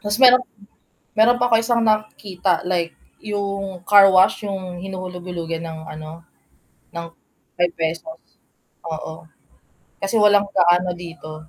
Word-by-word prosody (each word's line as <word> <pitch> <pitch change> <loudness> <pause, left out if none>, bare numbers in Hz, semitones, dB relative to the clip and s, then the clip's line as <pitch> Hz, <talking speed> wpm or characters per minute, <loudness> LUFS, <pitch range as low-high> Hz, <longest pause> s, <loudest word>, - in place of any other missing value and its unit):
Tapos 205 0 -1
merong 255 -1 +7 0.7
meron 225 +3 +4
pa 245 0 +2
ako - - +4
isang 235 0 +1
nakikita, 210 -4 0
like 175 -2 -1 0.3
yung 200 -3 -4
carwash, 195 +1 +5
yung 185 -3 -5
hinuhulug-hulugan 180 -3 -6
ng 160 -1 -7
ano, 155 +2 -9 0.7
ng 170 0 -6 0.5
₱5, 170 - -2 0.7
oo, 160 0 -7 0.8
kasi 195 +3 -1
walang 205 -1 +5
gaano 180 0 +3
dito. 160 -3 -10
185 Hz, 110 wpm, -21 LUFS, 170-205 Hz, 0.8 s, merong